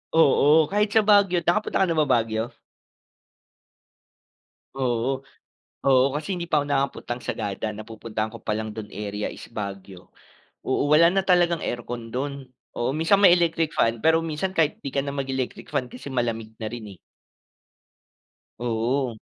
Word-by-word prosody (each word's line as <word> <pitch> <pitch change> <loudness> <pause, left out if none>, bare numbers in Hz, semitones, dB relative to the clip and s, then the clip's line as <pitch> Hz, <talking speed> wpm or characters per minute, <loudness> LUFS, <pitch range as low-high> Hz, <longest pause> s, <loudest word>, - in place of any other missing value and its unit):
Oo, 155 +1 +5
kahit 210 +1 +1
sa 220 - +6
Baguio. 200 -4 +4
Nakapunta 190 +2 +1
ka - - +4
na 165 - 0
ba 150 - +4
Baguio? 110 -1 +1 2.3
Oo, 125 -1 0 0.7
oo, 130 -1 +5
kasi 155 +6 -3
hindi 170 -1 -5
pa 150 -2 +3
ako - - -8
nakapuntang 135 -3 -2
Sagada, 105 +2 -3
napupuntahan 110 0 -5
ko 115 - -10
palang 110 0 -3
dun 105 -2 -7
area 105 +1 -4
is - - -10
Baguio. 100 -3 -7 0.5
Oo, 140 +2 0
wala 170 +2 +7
na 190 +2 +1
talagang 175 -3 +3
aircon 120 -1 -5
dun. 140 +1 -3 0.3
Oo, 120 +3 0
minsan 165 +6 +3
may 185 -3 +8
electric 165 -2 +1
fan 115 0 +2
pero 160 0 +5
minsan 165 +4 -3
kahit 155 -2 +1
di 140 - -4
ka 140 - +2
na 140 - -4
mag-electric 135 -2 -3
fan 125 - -1
kasi 135 +2 -9
malamig 115 -3 -2
na 110 - -3
rin 110 -5 -8
eh. - - -24 1.6
Oo. 120 +1 -1
130 Hz, 150 wpm, -24 LUFS, 115-160 Hz, 2.3 s, may